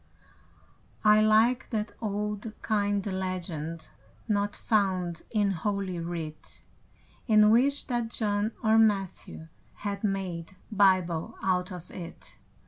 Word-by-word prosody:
I 210 0 +7
like 220 +4 +3
that 215 -2 -2
old, 210 0 -3
kind 205 -2 0
legend 180 -4 -4 0.4
Not 205 -1 0
found 185 -6 0
in 205 -3 +1
Holy 195 0 -2
Writ, 165 -2 -7 0.6
And 215 -2 +6
wish 275 +5 +3
that 240 -3 -2
John 210 -1 0
or 220 0 +5
Matthew 195 -6 0 0.4
Had 200 0 -3
made 190 -4 -3 0.2
Bible 185 -5 +2
out 180 0 +1
of 180 -2 -9
it. 170 -2 -10
200 Hz, 110 wpm, -28 LUFS, 180-215 Hz, 0.6 s, I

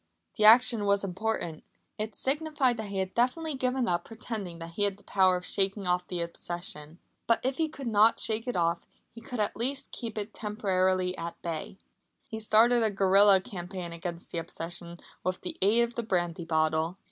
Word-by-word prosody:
The 215 - +2
action 230 -1 +7
was 200 0 +2
important. 190 -4 -3 0.4
It 215 0 -4
signified 280 -3 +1
that 220 -1 -5
he 200 - -4
had 190 0 -2
definitely 290 +7 0
given 255 -1 0
up 175 -3 0
pretending 215 -6 -6
that 165 0 -8
he 185 - -6
had 200 -1 +1
the 205 - -17
power 185 -2 +3
of 180 - -8
shaking 195 0 0
off 180 0 0
the 180 -2 -3
obsession. 170 -1 -5 0.3
But 230 - +3
if 260 +1 -1
he 320 -1 0
could 280 -3 -9
not 220 0 +4
shake 225 +2 0
it 245 - -2
off, 170 0 0 0.3
he 230 - -11
could 245 0 -6
at 210 - 0
least 270 +4 -3
keep 230 -3 -6
it 210 0 -4
temporarily 185 -3 0
at 170 0 -6
bay. 165 +2 -4 0.5
He 220 - -6
started 230 +3 +4
a 220 - +3
guerilla 195 0 +5
campaign 180 -4 -6
against 170 0 -6
the 170 - -2
obsession 170 +1 -6 0.3
with 185 0 -2
the - - -6
aid 215 +5 +4
of 235 0 -3
the 235 - -2
brandy 175 -5 -1
bottle. 160 +2 0
200 Hz, 195 wpm, -29 LUFS, 175-230 Hz, 0.5 s, action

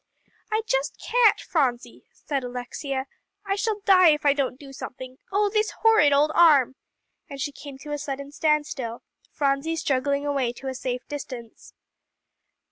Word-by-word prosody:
"I 435 +1 +1
just 275 -5 -1
can't, 475 -3 +3
Phronsie," 260 -7 -2
said 275 -3 -4
Alexia; 250 +2 -4 0.4
"I 390 - 0
shall 420 0 -1
die 370 -3 +7
if 300 -1 +1
I 285 - +6
don't 275 -2 -2
do 275 -2 -11
something! 260 -1 -8
Oh, 410 +1 +2
this 430 +1 +1
horrid 440 -10 +6
old 290 +2 +3
arm!" 295 -7 +5 0.6
and 280 -2 -8
she 290 +2 -2
came 280 -1 -10
to 295 - -7
a 295 - -2
sudden 280 -1 -5
standstill, 295 -6 -1 0.3
Phronsie 280 +3 0
struggling 280 -2 0
away 275 -4 0
to 265 +2 -6
a - - -3
safe 250 -1 -4
distance. 255 -5 -8
285 Hz, 155 wpm, -25 LUFS, 265-320 Hz, 0.6 s, die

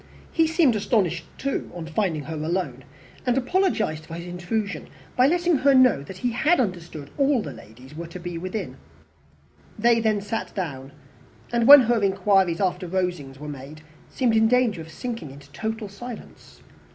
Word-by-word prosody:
He 325 -1 +3
seemed 315 -7 +3
astonished 195 -6 0
too 275 0 -3
on 170 -2 -6
finding 160 -2 -1
her 160 +4 -6
alone, 170 +4 -3 0.4
and 250 0 +1
apologized 250 - 0
for 165 - -7
his 170 +1 -7
intrusion, 180 +1 -3 0.3
by 250 +1 +5
letting 345 0 +2
her 275 +1 +4
know 255 - +5
that 175 +7 -10
he 245 +6 -1
had 310 +9 +2
understood 170 - -3
all 275 -4 +3
the 145 - -6
ladies 120 +5 -14 0.2
to 180 - -8
be 175 0 -6
within. 185 -6 -5 1.0
They 230 +1 +4
then 220 -2 +1
sat 215 +3 -4
down, 140 -8 -5 0.6
and 235 0 +2
when 285 0 +12
her 235 -2 +1
inquiries 195 -3 +2
after 180 -1 -1
Rosings 175 -7 -2
were 150 +2 -8
made, 145 +2 -9 0.3
seemed 245 -4 +1
in 220 0 +5
danger 240 -7 +2
of 160 - -10
sinking 230 - -6
into 140 +1 -14
total 220 +6 -4
silence. 225 +4 -11
195 Hz, 165 wpm, -24 LUFS, 160-240 Hz, 1.0 s, when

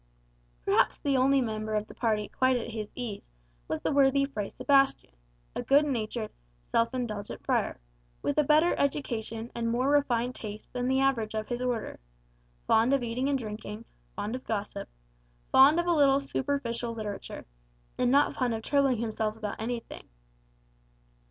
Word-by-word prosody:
Perhaps - - +3
the 280 -2 0
only 270 +1 +4
member 215 -2 -2
of 210 0 0
the - - -12
party 215 -3 0
quite 260 -1 +2
at 235 0 -5
his 215 -2 -5
ease 230 - -6 0.4
was - - -3
the - - 0
worthy 275 -1 +4
Fray 215 -8 -4
Sebastian, 275 - +2 0.4
a - - -1
good 285 +2 +4
natured, 225 -4 -2 0.4
self 230 0 +2
indulgent 220 -5 -5
friar, - - 0 0.4
with 285 - 0
a - - +5
better 305 +4 +4
education 235 -5 -2
and 230 -1 -2
more 250 +4 +1
refined 250 -4 +2
tastes 215 -3 -7
than 250 0 -3
the 265 +1 +2
average 235 -6 +1
of 215 0 -3
his 240 0 -2
order; 245 -3 -2 0.7
fond 230 +5 +4
of 270 - -1
eating 245 +4 -1
and 280 - +2
drinking, 215 -1 -7 0.3
fond 210 +3 -3
of 255 - -7
gossip, 205 - -4 0.6
fond 285 +5 +7
of 345 - 0
a 350 - +3
little 280 -3 +5
superficial 250 -4 -2
literature, 210 -3 -6 0.5
and 250 - +3
not 280 +3 +4
fond 245 -3 0
of 220 - -6
troubling 275 -2 +2
himself 220 -1 -2
about 215 -1 -5
anything. 235 +1 -5
245 Hz, 165 wpm, -29 LUFS, 220-275 Hz, 0.7 s, fond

